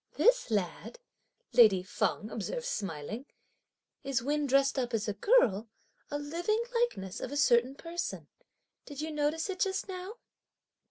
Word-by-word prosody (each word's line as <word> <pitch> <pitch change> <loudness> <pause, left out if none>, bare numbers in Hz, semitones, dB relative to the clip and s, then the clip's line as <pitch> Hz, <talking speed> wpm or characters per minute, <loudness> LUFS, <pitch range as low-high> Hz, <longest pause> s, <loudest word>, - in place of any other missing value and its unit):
"This - - +4
lad," 205 - -2 0.6
lady 205 -6 +6
Feng 210 +3 -1
observed 480 - -4
smiling, 205 - -4 0.8
"is 270 -2 -1
when 295 +2 0
dressed 275 +1 +3
up 245 -2 -1
(as 215 -1 -1
a 210 - 0
girl), 225 - +3 0.4
a 290 - -2
living 345 +10 -1
likeness 465 - -1
of 255 - -5
a 285 - -3
certain 250 -1 +4
person; 335 +3 -5 0.6
did 290 -2 -8
you 315 +1 -3
notice 300 +2 0
it 380 -2 -4
just 390 0 0
now?" 375 +3 -6
280 Hz, 145 wpm, -31 LUFS, 225-360 Hz, 0.8 s, lady